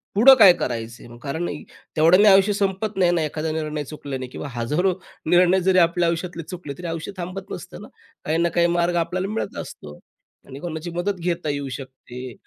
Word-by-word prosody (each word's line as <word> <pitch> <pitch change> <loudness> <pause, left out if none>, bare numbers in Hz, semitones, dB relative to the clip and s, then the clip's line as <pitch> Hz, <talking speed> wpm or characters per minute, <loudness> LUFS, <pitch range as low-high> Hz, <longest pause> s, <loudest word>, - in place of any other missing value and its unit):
पुढं 245 +6 +9
काय 190 -5 +9
करायचं 115 -1 -4
आहे? 120 0 -12
कारण 160 +5 -3 0.5
तेवढ्याने 180 +7 +6
आयुष्य 195 +1 +5
संपत 200 +1 -2
नाही 180 -2 +4
ना. 170 - +1
एखादा 155 +1 -3
निर्णय 155 -1 -3
चुकल्याने 135 -3 -6
किंवा 130 - -7
हजारो 150 +11 0 0.3
निर्णय 175 +2 +4
जरी 185 +1 +3
आपल्या 170 0 +3
आयुष्यातले 170 0 -4
चुकले 175 -6 -6
तरी 180 - -5
आयुष्य 165 +3 -4
थांबत 185 +2 -6
नसतं - - -8
ना - - -10 0.4
काही 155 +2 0
ना 170 0 +2
काही 170 +1 +2
मार्ग 175 0 +1
आपल्याला 185 +3 -3
मिळत 225 - -4
असतो. 75 0 -11 0.5
आणि 135 - -9
कोणाची 165 +1 -5
मदत 175 +4 -1
घेता 170 -2 -2
येऊ 140 -1 -3
शकते 130 -1 -9
170 Hz, 185 wpm, -22 LUFS, 145-180 Hz, 0.5 s, पुढं